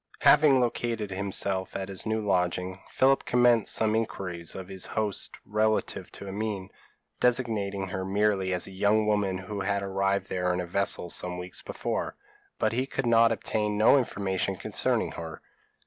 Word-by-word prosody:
Having 145 -3 +6
located 115 -3 -1
himself 95 -1 -1
at 95 -1 -3
his 95 +2 -4
new 110 0 0
lodging, 90 -1 0
Philip 135 +1 +3
commenced 120 -3 +3
some 110 -1 +3
inquiries 90 -6 -3
of 95 -1 -7
his 95 -1 -2
host 105 -2 -2
relative 110 +1 0
to 100 - -8
Amine, 100 -1 -4 0.5
designating 105 -6 0
her 95 0 -3
merely 100 -1 +1
as 90 -1 +1
a - - -8
young 105 +3 +2
woman 105 -3 +1
who 100 +2 -5
had 100 +1 0
arrived 95 0 0
there 90 -1 -1
in - - -2
a 90 - -2
vessel 90 -1 0
some 90 0 -2
weeks 90 +1 -6
before, - - -3 0.4
but 110 +1 +1
he 130 +3 0
could 135 - -3
obtain 110 -2 +2
no 110 +6 +6
information 95 -5 -1
concerning - - -1
her. 80 -1 -7
100 Hz, 160 wpm, -28 LUFS, 95-110 Hz, 0.5 s, Having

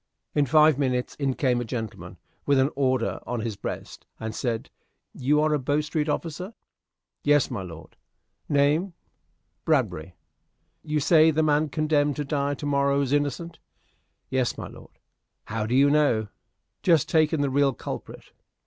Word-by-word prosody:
In 145 -2 +2
five 155 +1 +5
minutes 125 -3 0
in 135 -3 -1
came 125 -3 +1
a - - -1
gentleman, 110 -2 -6 0.3
with 140 -1 +4
an 135 +2 +3
order 130 -3 0
on 120 -1 -2
his 110 -2 -3
breast, - - -7
and 110 -1 -4
said, 115 -1 -3 0.4
"You 145 +4 +1
are 155 0 +2
a 150 - +1
Bow 145 +3 0
Street 150 0 -2
officer?" 180 +8 -4 0.7
"Yes, 145 -2 +3
my 110 -6 -3
lord." 85 -3 -10 0.5
"Name?" 150 +6 +2 0.7
"Bradbury." 80 +3 0 0.7
"You 150 -1 -1
say 155 +2 +5
the 160 0 +2
man 150 0 +2
condemned 150 -1 +1
to 150 - -3
die 140 0 -1
to 145 - -7
morrow 140 0 +2
is 135 0 -1
innocent?" 145 +4 -1 0.7
"Yes, 130 -2 -1
my - - -6
lord." - - -15 0.5
"How 110 0 -3
do 120 - 0
you 140 +2 +5
know?" 140 -8 +2 0.5
"Just 165 -5 +3
taken 155 -2 +2
the 140 -2 0
real 140 0 +3
culprit." 120 - -8
140 Hz, 155 wpm, -25 LUFS, 125-150 Hz, 0.7 s, five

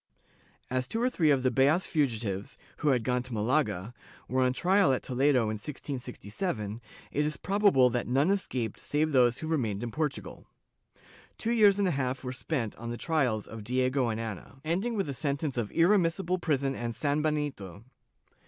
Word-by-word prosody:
As 130 0 0
two 225 - -2
or 250 +2 +1
three 160 -9 +2
of 135 -3 +3
the 130 - +3
Beas 140 +8 +3
fugitives, 115 - -1 0.2
who 150 - -2
had 125 -5 +3
gone 125 +1 +1
to 125 0 -8
Malaga, 110 -3 0 0.3
were 130 +1 +1
on 125 0 +3
trial 185 +4 +3
at 130 - -2
Toledo 130 0 +2
in 110 -1 -2
1667, 120 - -4 0.3
it 150 - +1
is 150 -1 -2
probable 195 -11 +3
that 120 +1 -1
none 140 +8 +2
escaped 125 - -2
save 155 +2 0
those 125 -3 +4
who 160 - -5
remained 120 -10 -1
in 120 - -4
Portugal. 150 0 -4 0.9
Two 225 - -1
years 210 -4 +5
and 200 -1 +2
a - - +2
half 130 -2 -2
were 125 0 -4
spent 125 -4 -3
on 115 +2 -6
the 120 - -4
trislls 130 -10 0
of 110 -1 -9
Diego 130 +2 +1
and 110 0 -2
Ana, 115 +3 -7
ending 195 +9 0
with 195 - 0
a 140 - -3
sentence 140 +1 -2
of 115 -4 -1
irremissible 180 0 +2
prison 140 -5 0
and 120 -3 -4
sanbenito. 145 - -2
135 Hz, 180 wpm, -29 LUFS, 120-155 Hz, 0.9 s, years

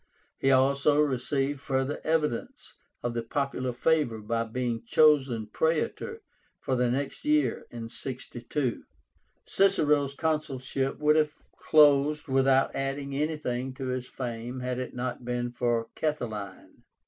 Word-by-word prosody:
He 135 - +2
also 140 +2 +4
received 135 0 0
further 135 +1 -1
evidence 155 -6 -1 0.3
of 120 0 -1
the 120 - -1
popular 130 +1 -2
favor 135 -1 +1
by 115 +2 -2
being 120 0 -2
chosen 135 -4 +4
Praetor 165 - -1 0.4
for 130 - -1
the 125 -1 +2
next 135 +3 -3
year 300 0 +1
(62). 120 +2 -4 0.6
Cicero's 150 -8 +3
consulship 135 -4 -1
would 150 +1 +3
have 150 -1 +1 0.2
closed 150 0 +4
without 135 0 +3
adding 140 +1 -3
anything 135 -4 -2
to 130 0 -4
his 125 0 -3
fame 120 0 -5
had 125 0 -2
it 130 - -5
not 125 0 -4
been 120 0 -2
for 120 -1 0
Catiline. 110 -11 -4
135 Hz, 125 wpm, -28 LUFS, 120-150 Hz, 0.6 s, also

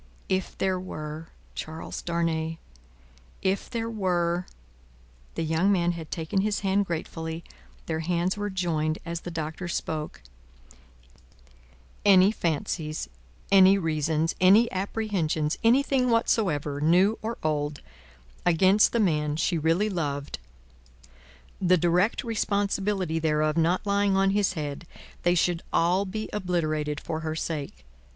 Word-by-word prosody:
If 185 -1 -1
there 190 -1 0
were 155 -3 -7 0.3
Charles 160 +1 -6
Darnay, 165 -1 -1 0.9
if 190 +1 0
there 230 -2 -3
were 180 -5 0 0.4
" - - -29
The 165 - -1
young 160 +5 +2
man 175 -3 +2
had 165 -3 -7
taken 165 +3 -1
his 210 +1 -1
hand 195 0 +1
gratefully; 160 0 -4 0.4
their 160 -1 -2
hands 175 +2 0
were 205 0 -3
joined 165 -4 -1
as 170 0 -4
the - - -6
Doctor 160 +1 -4
spoke: 155 - -4 0.8
" - - -29
any 195 -1 +6
fancies, 155 - -2 0.4
any 195 0 +7
reasons, 160 -2 0
any 205 +6 +6
apprehensions, 185 -6 -1
anything 255 +2 +3
whatsoever, 155 -11 +1
new 180 +8 +4
or 225 +2 -4
old, 150 -2 -1 0.6
against 185 +4 +4
the 235 - +2
man 150 -7 +1
she 170 +3 0
really 165 +7 +2
loved 145 -7 -3 1.2
the 185 0 +4
direct 180 - +2
responsibility 200 -6 0
thereof 155 -1 +1
not 170 +4 +1
lying 200 -1 +2
on 195 0 +3
his 200 -2 +1
head 150 0 -5 0.3
they 175 0 +3
should 175 0 +1
all 180 +4 +2
be 215 +3 -4
obliterated 155 -6 -1
for 160 - -4
her 160 0 -3
sake. 145 - -5
170 Hz, 130 wpm, -26 LUFS, 155-195 Hz, 1.2 s, any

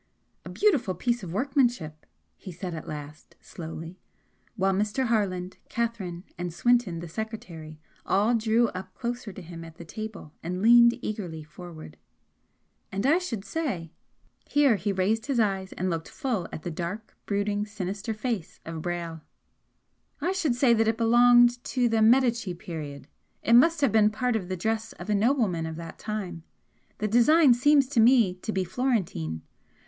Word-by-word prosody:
"A - - -9
beautiful 285 - +1
piece 240 -1 -1
of 180 -4 -7
workmanship," 240 - 0 0.3
he 185 - -10
said, 180 +1 -6
at 160 - -7
last, 150 0 -9
slowly, 165 +1 -8 0.6
while 195 -2 +1
Mr. 210 +6 0
Harland, 190 -6 -1
Catherine, 205 -7 -3 0.2
and 175 0 -3
Swinton 215 -3 +1
the 170 - -7
secretary 165 -6 -7 0.2
all 210 +5 +2
drew 225 0 +2
up 185 0 -8
closer 240 -3 -4
to 185 - -10
him 165 0 -9
at 165 -1 -11
the 170 - -10
table 210 -4 -8
and 180 +2 -4
leaned 235 +1 +7
eagerly 175 -7 -4
forward 155 - -11 0.9
"And 195 +4 -2
I 310 +6 +4
should 230 - -5
say" 205 - -3 0.6
here 285 -5 +4
he 205 0 -1
raised 210 +5 0
his 270 -4 0
eyes 195 -3 0
and 185 - -2
looked 165 -1 -4
full 240 - -2
at 155 - -7
the 175 - -4
dark, 180 +7 -5
brooding, 205 +1 -1
sinister 205 +1 -4
face 215 -6 -4
of 165 -1 -5
Brayle 170 -2 -4 1.0
"I 340 +5 0
should 330 -10 0
say 245 -1 +4
that 225 -1 +2
it 225 0 +1
belonged 240 +1 +5
to 250 -2 +1
the 225 -1 +1
Medici 235 -4 +3
period. 150 -5 -7 0.4
It 230 - +2
must 310 +6 +6
have 275 -6 +3
been 215 0 +5
part 245 +3 -1
of 190 -5 -3
the 185 - -2
dress 220 +4 -2
of 215 - -6
a - - +3
nobleman 205 -7 +1
of 160 - -5
that 165 0 -9
time 195 -6 -4 0.6
the 210 - -1
design 255 +6 +6
seems 280 +3 +4
to 255 - +1
me 230 -4 +5
to 220 - -4
be 190 -2 0
Florentine. 180 - -2
210 Hz, 165 wpm, -27 LUFS, 175-240 Hz, 1.0 s, leaned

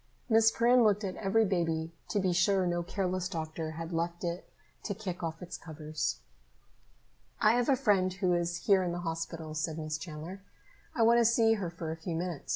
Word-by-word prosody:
Miss 225 0 +6
Perrin 240 +2 +4
looked 210 -1 +3
at 190 -2 -3
every 220 +2 +2
baby 165 -4 -1 0.2
to 205 - +1
be 185 -2 +1
sure 185 +2 +3
no 175 0 0
careless 185 0 -2
doctor 160 -2 -4
had 165 +2 -6
left 170 +1 -2
it 175 +1 -4 0.3
to 200 - -4
kick 185 -4 -5
off 165 +1 -4
its 180 - -7
covers. 155 - -4 1.2
"I 215 - +5
have 245 +2 +1
a 275 - +6
friend 205 -8 +2
who 185 -1 +1
is 175 0 -1
here 195 -2 +5
in 175 -2 -1
the 175 - -4
hospital," 165 -1 -4
said 155 +1 -2
Miss 155 -1 -3
Chandler. 170 +3 -7 0.5
"I 230 - +3
want 235 +1 +6
to - - +5
see 225 0 +4
her 200 -6 -2
for 165 -1 -5
a - - -3
few 165 +1 -4
minutes. 170 -2 -4
175 Hz, 200 wpm, -31 LUFS, 165-200 Hz, 1.2 s, Miss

